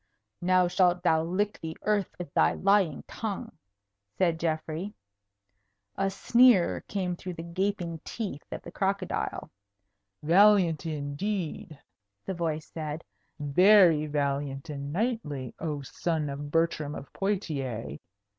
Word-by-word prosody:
"Now 180 0 +4
shalt 175 0 +2
thou 160 -3 +4
lick 200 +5 -1
the 160 0 -6
earth 210 -3 +1
with 175 -5 -7
thy - - +4
lying 195 -6 +2
tongue," 210 -4 -5 0.6
said 170 -3 +2
Geoffrey. 165 +4 -3 1.0
A 195 0 +1
sneer 235 0 +4
came 185 -3 -2
through 180 0 -7
the 165 - -6
gaping 170 -1 -2
teeth 200 -11 -5
of - - -6
the - - -9
crocodile. 195 -1 -2 0.7
"Valiant, 175 -2 +5
indeed!" 155 +2 -3 0.5
the 190 - -2
voice 160 -3 -2
said. 155 0 -5 0.4
"Very 165 +1 +5
valiant 140 0 -2
and 140 0 -5
knightly, 170 - -2
oh 150 -3 -3
son 155 +1 -2
of 145 +1 -6
Bertram 155 -2 0
of 140 - -9
Poictiers! 135 - -3
170 Hz, 120 wpm, -28 LUFS, 150-195 Hz, 1.0 s, Valiant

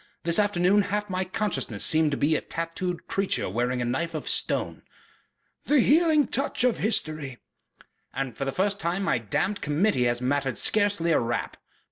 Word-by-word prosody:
This 170 +2 +2
afternoon 205 -1 +3
half 210 0 -3
my 185 0 0
consciousness 180 - -2
has - - +5
seemed 155 -1 +4
to 140 - -2
be 155 +2 +2
a - - 0
tattooed 165 +2 -4
creature 195 0 -1
wearing 120 +5 -1
a - - -2
knife 165 +8 -2
of - - -5
stone...." - - 0 0.8
"The 295 -1 +3
healing 305 +1 +4
touch 275 -1 0
of 250 -2 +2
history." 155 - -1 0.7
"And 135 -4 -4
for - - -4
the 135 - -1
first 200 +5 -1
time 175 +4 -1
my 130 -10 +1
damned 185 - -2
Committee 150 -2 +1
has 120 0 0
mattered 135 +1 -1
scarcely 205 -5 +1
a - - +4
rap." 120 0 -3
170 Hz, 175 wpm, -26 LUFS, 135-205 Hz, 0.8 s, has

